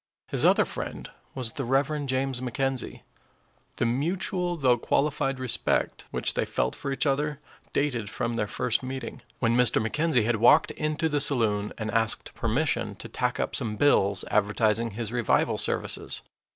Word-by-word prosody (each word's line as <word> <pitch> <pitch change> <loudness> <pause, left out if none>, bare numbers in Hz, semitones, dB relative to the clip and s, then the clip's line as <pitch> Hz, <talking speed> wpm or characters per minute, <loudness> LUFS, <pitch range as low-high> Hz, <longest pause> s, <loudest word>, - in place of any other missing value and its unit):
His - - +2
other - - +5
friend - - -6 0.2
was 125 -4 -1
the 135 - -4
Rev. 140 +3 0
James 130 -1 0
McKenzie. 130 +1 -2 0.7
The - - 0
mutual 175 - -1
though 125 -5 +3
qualified 140 0 0
respect 130 -2 0
which - - 0
they - - 0
felt - - -1
for 140 - -4
each 135 - +1
other 150 +1 0 0.3
dated 125 -8 -1
from 115 +2 -2
their 105 -2 -1
first 120 +2 0
meeting, 130 -2 -6 0.2
when 115 -1 +1
Mr. 125 -1 +4
McKenzie 125 +2 +1
had 120 0 +1
walked 115 +3 +5
into 155 +1 -1
the 150 -2 0
saloon 110 -7 +1
and 110 -1 -3
asked 115 0 0
permission 130 +7 -1
to - - -9
tack - - -1
up - - -1
some 105 -2 -2
bills 100 -7 +3
advertising 105 +2 +2
his 115 -1 -4
revival 120 -2 +1
services. - - -2
125 Hz, 160 wpm, -27 LUFS, 115-140 Hz, 0.7 s, other